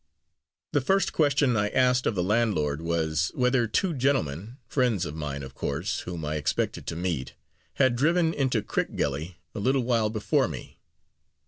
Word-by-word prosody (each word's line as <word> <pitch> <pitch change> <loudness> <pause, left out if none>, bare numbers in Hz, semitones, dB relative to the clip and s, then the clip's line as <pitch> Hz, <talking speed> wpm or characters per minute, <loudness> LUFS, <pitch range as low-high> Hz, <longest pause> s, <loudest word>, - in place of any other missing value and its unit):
The 145 - +2
first 195 +9 +1
question 140 -4 +3
I 105 -1 +1
asked 125 0 +3
of 110 - 0
the 90 - +1
landlord 90 -9 +1
was, 80 -1 0
whether 125 -1 +2
two 175 - +1
gentlemen 120 - -1
(friends 120 - +1
of 75 - -5
mine, 75 -3 -4
of 65 -1 -9
course, 85 +11 -2
whom 85 -3 -5
I 75 +1 -1
expected 75 - -2
to - - -3
meet) 85 -6 -3 0.4
had 130 -3 +3
driven 165 +5 +2
into 130 -8 0
Crickgelly, 75 +6 -2 0.2
a 110 - -5
little 130 +4 +2
while 115 -3 +2
before 110 -1 +1
me. - - -9
110 Hz, 160 wpm, -27 LUFS, 80-130 Hz, 0.4 s, question